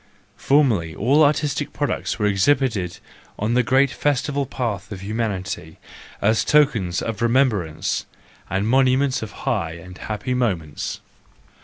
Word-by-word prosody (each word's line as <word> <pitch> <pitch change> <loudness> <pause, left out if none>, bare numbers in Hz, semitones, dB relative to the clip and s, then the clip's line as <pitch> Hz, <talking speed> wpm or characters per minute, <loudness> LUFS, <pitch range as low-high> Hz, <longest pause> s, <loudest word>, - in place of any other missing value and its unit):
Formerly 115 - +2
all 140 +8 +4
artistic 145 -1 +1
products 145 - -2
were 105 - 0
exhibited 105 -2 +1 0.4
on 110 +3 -1
the 125 - +4
great 135 +3 +3
festive 140 -1 -1
path 105 -8 -3
of 95 -2 -6
humanity, 100 -6 -3 0.5
as 110 +2 +3
tokens 115 -13 +2
of 115 0 -4
remembrance, 115 - +1 0.4
and 95 +3 0
monuments 130 +1 +3
of 110 -2 -6
high 80 -1 0
and 90 +2 -11
happy 110 +4 -3
moments. 90 - -2
115 Hz, 125 wpm, -22 LUFS, 95-135 Hz, 0.5 s, all